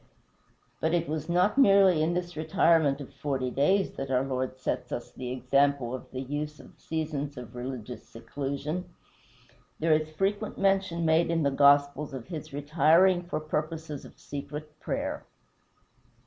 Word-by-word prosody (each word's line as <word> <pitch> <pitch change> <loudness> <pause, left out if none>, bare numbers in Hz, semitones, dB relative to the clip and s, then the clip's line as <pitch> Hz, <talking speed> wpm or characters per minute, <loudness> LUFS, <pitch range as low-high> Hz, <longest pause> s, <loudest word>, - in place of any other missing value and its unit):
But 160 +2 +1
it 170 -1 0
was 155 +1 -3
not 180 +9 +3
merely 195 - +6
in 165 +2 +1
this 175 0 -3
retirement 160 -2 +3
of 140 - -10
forty 130 -3 -2
days 190 +10 +2
that 135 0 -4
our 130 0 +2
Lord 130 -1 -3
set 130 - -3
us - - -5
the 125 -1 -6
example 130 0 +1
of 130 - -7
the 130 - -5
use 150 +3 -4
of - - -14
seasons 150 -3 -3
of 125 -2 -8
religious 125 -1 -6
seclusion. 145 +8 -4 0.9
There 160 0 +3
is 155 0 +1
frequent 200 +6 -2
mention 190 -4 +1
made 160 +1 +3
in 165 -1 +1
the 140 - +2
Gospels 140 +1 +4
of 130 +4 -8
his 160 -6 -6
retiring 155 +6 +4
for - - -1
purposes 155 -1 -4
of - - -14
secret 150 +2 -7
prayer. - - -3
150 Hz, 155 wpm, -28 LUFS, 135-165 Hz, 0.9 s, merely